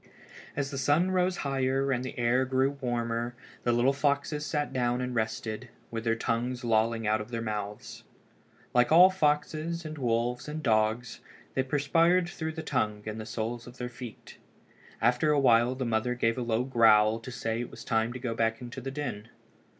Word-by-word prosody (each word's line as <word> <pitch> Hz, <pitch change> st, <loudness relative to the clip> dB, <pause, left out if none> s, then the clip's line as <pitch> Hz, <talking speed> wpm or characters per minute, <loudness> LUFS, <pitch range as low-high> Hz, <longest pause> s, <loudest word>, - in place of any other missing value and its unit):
As 140 Hz, 0 st, -2 dB
the 140 Hz, -, -3 dB
sun 150 Hz, +7 st, +2 dB
rose 185 Hz, 0 st, +1 dB
higher 135 Hz, 0 st, +1 dB
and 125 Hz, -1 st, 0 dB
the 130 Hz, -, -6 dB
air 120 Hz, +2 st, +2 dB
grew 130 Hz, +1 st, +1 dB
warmer 120 Hz, -3 st, -2 dB, 0.3 s
the 120 Hz, -, +1 dB
little 120 Hz, +3 st, +3 dB
fellows 145 Hz, +1 st, 0 dB
sat 145 Hz, -1 st, -2 dB
down 125 Hz, -1 st, +1 dB
and 125 Hz, 0 st, -3 dB
rested, 110 Hz, +1 st, -3 dB, 0.2 s
with 115 Hz, 0 st, -4 dB
their 115 Hz, 0 st, +2 dB
tongues 120 Hz, +2 st, -2 dB
lolling 115 Hz, 0 st, +1 dB
out 110 Hz, +1 st, +2 dB
of 105 Hz, -, -8 dB
their 115 Hz, -1 st, -3 dB
mouths. 105 Hz, -1 st, -5 dB, 0.7 s
Like 125 Hz, +2 st, +3 dB
all 180 Hz, +4 st, +8 dB
foxes 160 Hz, 0 st, 0 dB
and 155 Hz, -1 st, -6 dB
wolves 120 Hz, +1 st, 0 dB
and 155 Hz, +1 st, -5 dB
dogs 110 Hz, +2 st, +1 dB, 0.3 s
they 130 Hz, -, +1 dB
perspired 165 Hz, +6 st, +2 dB
through 160 Hz, -2 st, -4 dB
the 160 Hz, 0 st, -6 dB
tongue 105 Hz, -8 st, -1 dB
and 110 Hz, +1 st, -5 dB
the 110 Hz, -, -8 dB
soles 115 Hz, +2 st, -4 dB
of 125 Hz, +1 st, -12 dB
their 125 Hz, 0 st, -4 dB
feet. 120 Hz, -2 st, -10 dB, 0.6 s
After 125 Hz, +6 st, +2 dB
a 150 Hz, -, +3 dB
while 120 Hz, -1 st, +4 dB
the 130 Hz, 0 st, -3 dB
mother 115 Hz, +2 st, 0 dB
gave 115 Hz, -2 st, +1 dB
a 125 Hz, -, -3 dB
low 115 Hz, 0 st, 0 dB
growl 115 Hz, -3 st, +4 dB
to 115 Hz, -, -9 dB
say 115 Hz, -2 st, -3 dB
that 120 Hz, -, -3 dB
it -, -, -16 dB
was -, -, -10 dB
time 115 Hz, 0 st, +1 dB
to 125 Hz, -, -5 dB
go 125 Hz, -2 st, -3 dB
back 115 Hz, 0 st, 0 dB
into 125 Hz, +2 st, -7 dB
the 135 Hz, -, -4 dB
den. 125 Hz, -6 st, -5 dB
125 Hz, 195 wpm, -29 LUFS, 115-140 Hz, 0.7 s, all